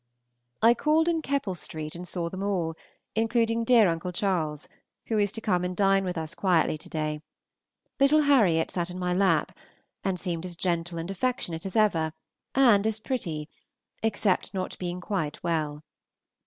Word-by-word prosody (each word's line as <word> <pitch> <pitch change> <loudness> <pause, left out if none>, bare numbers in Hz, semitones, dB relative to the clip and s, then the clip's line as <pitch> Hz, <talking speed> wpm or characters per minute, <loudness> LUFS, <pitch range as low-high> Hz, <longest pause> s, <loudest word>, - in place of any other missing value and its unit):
I 230 +1 +8
called 310 +6 +2
in 330 -2 +1
Keppel 275 -10 -1
Street 155 -2 -5
and 180 +1 -7
saw 175 -2 -2
them 185 +3 -6
all, 185 -5 -1 0.4
including 230 +1 +1
dear 230 -3 +6
Uncle 170 +1 -2
Charles, 170 -6 -1 0.4
who 220 -2 0
is 205 -1 +2
to 225 - -4
come 180 -5 +1
and 180 0 -3
dine 195 -1 +4
with 180 -2 -3
us 160 +1 -4
quietly 180 -5 +2
to 155 - -10
day. 155 -1 -2 0.8
Little 285 +3 +5
Harriot 210 - +4
sat 175 -1 -2
in 180 - -7
my 180 -1 -1
lap, 180 -5 +2 0.5
and 190 -2 -1
seemed 170 -3 -3
as 180 -1 -6
gentle 170 -1 -1
and 165 +3 -4
affectionate 195 -6 -2
as 190 - -7
ever, 165 -8 +2 0.4
and 230 -6 +5
as 220 0 -1
pretty, 170 - -3 0.5
except 205 -3 0
not 185 -1 -3
being 180 0 -4
quite 185 -7 -3
well. 155 -3 -1
185 Hz, 170 wpm, -27 LUFS, 165-220 Hz, 0.8 s, I